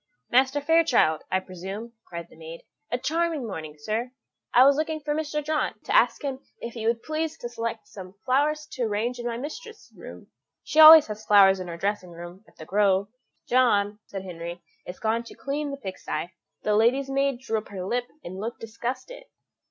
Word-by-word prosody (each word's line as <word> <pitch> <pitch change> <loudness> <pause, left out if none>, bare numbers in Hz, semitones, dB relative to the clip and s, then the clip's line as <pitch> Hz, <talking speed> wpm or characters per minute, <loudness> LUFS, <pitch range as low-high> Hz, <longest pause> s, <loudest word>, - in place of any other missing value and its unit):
"Master 265 +3 +3
Fairchild, 290 - +3
I 185 - +2
presume," 195 +6 -8
cried 170 -1 -7
the - - -19
maid. 165 +1 -10 0.3
"A 245 - +1
charming 320 +1 -1
morning, 160 -8 -6
sir. 220 +11 -3 0.4
I 250 +2 +7
was 280 0 +6
looking 310 +1 -2
for 295 0 -2
Mr. 300 -1 -2
John, 310 0 -1
to - - -1
ask - - +3
him 270 -2 -3 0.2
if 235 - -6
he 225 -2 -4
would 230 0 0
please 315 +1 -3
to 240 - -6
select 230 -2 -5
some 190 -2 -11
flowers 300 +4 +1
to 255 - -6
arrange 225 +4 -2
in 240 - -3
my 230 -1 -3
mistress's 440 - -9
room: - - -12 0.3
she 310 - -1
always 315 -1 +11
has 215 0 -7
flowers 195 -2 +6
in 185 - -6
her 170 -1 -6
dressing 200 0 -2
room 175 +3 -10
at - - -23
The 155 - -10
Grove." 200 +1 +2 0.4
"John," 210 -5 +2
said 195 -1 -6
Henry, 170 -1 -7 0.2
"is 180 - -7
gone 225 +1 0
to - - -12
clean 290 +1 -3
the 280 - -5
pig 190 -8 -7
sty." 170 +4 -4 0.3
The 210 - +2
lady's 245 +6 +3
maid 275 -2 +1
drew 225 -4 -2
up 215 - -13
her 185 -2 -6
lip, 245 +4 -1 0.2
and 185 +2 -7
looked 230 +4 -5
disgusted. 255 - -6
230 Hz, 200 wpm, -26 LUFS, 195-280 Hz, 0.4 s, always